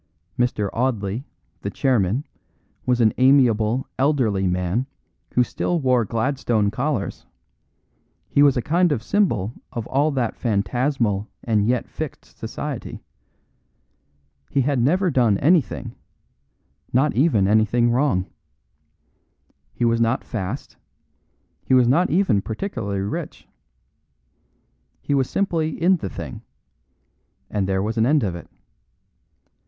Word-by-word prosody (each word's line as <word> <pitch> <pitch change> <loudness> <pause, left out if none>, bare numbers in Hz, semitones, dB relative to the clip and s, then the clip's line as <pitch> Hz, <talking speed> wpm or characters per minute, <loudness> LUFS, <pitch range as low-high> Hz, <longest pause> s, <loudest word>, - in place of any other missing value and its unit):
Mr. 120 -4 0
Audley, 115 -1 -1 0.4
the - - -3
chairman, 125 -1 +1 0.6
was 125 -1 +2
an 110 -2 +4
amiable, 125 -3 +3
elderly 125 -9 +2
man 90 +8 -1 0.5
who 125 - +5
still 170 +7 -1
wore 125 -4 +2
Gladstone 115 -2 0
collars; 125 -2 -3 1.0
he 140 - +2
was 140 -2 +5
a 120 - -1
kind 175 +2 +2
of 120 -7 -1
symbol 120 - +1 0.2
of 115 -2 -4
all 140 +5 +1
that 130 -6 -1
phantasmal 115 0 0
and 105 -3 +1
yet 125 0 0
fixed - - -6
society. - - -6 1.5
He 140 - +1
had 135 -1 +1
never 180 +8 +2
done 120 -7 +3
anything 135 - +1 1.0
not 135 +5 +2
even 115 - +3
anything 110 +3 +3
wrong. 120 -7 +1 1.5
He 120 - -1
was 115 0 +2
not 115 +3 +1
fast; 95 -6 -5 0.9
he 130 - +2
was 125 -2 +5
not 165 +9 +3
even 150 - +2
particularly 100 - -4
rich. 100 - -5 1.5
He 145 - -2
was 135 -2 +1
simply 165 -6 -1
in 180 +2 +4
the 95 - -5
thing; 80 -8 -7 1.1
and 95 -2 -1
there 95 0 +1
was 110 +2 -2
an 110 - +3
end 145 -1 +3
of 95 -4 -1
it. 85 - -9
120 Hz, 120 wpm, -22 LUFS, 105-140 Hz, 1.5 s, who